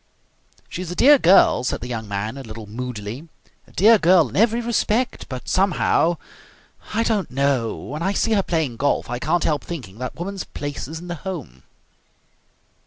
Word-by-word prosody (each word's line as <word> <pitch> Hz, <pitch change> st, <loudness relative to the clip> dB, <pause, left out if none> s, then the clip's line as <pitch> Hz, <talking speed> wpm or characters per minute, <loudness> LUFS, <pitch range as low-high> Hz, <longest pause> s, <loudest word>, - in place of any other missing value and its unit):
"She 180 Hz, -, -6 dB
is 180 Hz, -, -6 dB
a 175 Hz, -, -5 dB
dear 285 Hz, +6 st, +6 dB
girl," 180 Hz, -, +5 dB
said -, -, -1 dB
the 120 Hz, -, -5 dB
young 110 Hz, -3 st, -5 dB
man 100 Hz, +4 st, -3 dB
a 140 Hz, -, -7 dB
little 110 Hz, -3 st, -9 dB
moodily, 120 Hz, +4 st, -6 dB, 0.4 s
"a -, -, -19 dB
dear 220 Hz, +3 st, +5 dB
girl 170 Hz, -5 st, +4 dB
in -, -, -10 dB
every 230 Hz, +3 st, +3 dB
respect. 235 Hz, +1 st, -1 dB
But 130 Hz, -2 st, -7 dB
somehow 180 Hz, -3 st, +2 dB, 0.8 s
I 225 Hz, -, +2 dB
don't 215 Hz, -4 st, 0 dB
know 135 Hz, -4 st, 0 dB
when 150 Hz, +3 st, -7 dB
I 195 Hz, +3 st, 0 dB
see 225 Hz, -, 0 dB
her 205 Hz, -, +3 dB
playing 160 Hz, -10 st, -1 dB
golf 140 Hz, -2 st, 0 dB
I 120 Hz, -, -2 dB
can't 165 Hz, +5 st, 0 dB
help 150 Hz, -3 st, 0 dB
thinking 120 Hz, -, -8 dB
that 130 Hz, -, -5 dB
woman's 190 Hz, +2 st, -5 dB
place 145 Hz, -2 st, -6 dB
is 160 Hz, +3 st, -7 dB
in 175 Hz, -, -10 dB
the 175 Hz, -, -3 dB
home." 155 Hz, -, -7 dB
160 Hz, 185 wpm, -22 LUFS, 125-190 Hz, 0.8 s, dear